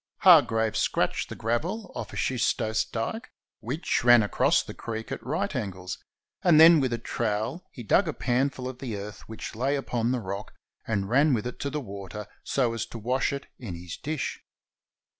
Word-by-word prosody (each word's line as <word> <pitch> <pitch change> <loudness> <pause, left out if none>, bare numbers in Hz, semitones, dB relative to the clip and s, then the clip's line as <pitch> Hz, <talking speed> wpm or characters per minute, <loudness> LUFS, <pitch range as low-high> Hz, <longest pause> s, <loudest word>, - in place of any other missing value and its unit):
Hargraves 115 - +5
scratched - - 0
the - - -6
gravel 120 - -2
off 115 -4 -6
a - - -9
schistose 110 -1 0
dike 225 - -4 0.3
which 125 - -1
ran 120 -2 +7
across 105 - +2
the - - -8
creek 110 -1 -6
at - - -5
right 160 +6 -2
angles, 95 -6 -4 0.4
and 170 -4 +5
then 165 0 +9
with 130 -3 0
a 120 - 0
trowel 115 - -2
he 120 - -9
dug 180 - +3
a 155 - -1
panful 130 0 0
of 130 -1 -7
the 115 -6 -4
earth 100 0 -7
which 110 - -6
lay 135 +5 +1
upon 120 -4 -1
the 130 - 0
rock, 100 0 -6 0.3
and 100 -3 0
ran 135 +5 +4
with 110 - -3
it 125 - -5
to 140 - -2
the 150 - -2
water 100 -4 -7 0.2
so 125 -4 +1
as 115 -1 -3
to - - -8
wash 125 +4 0
it 140 -1 -5
in 105 -9 -6
his 85 0 -7
dish. 150 -1 -4
120 Hz, 190 wpm, -27 LUFS, 110-140 Hz, 0.4 s, then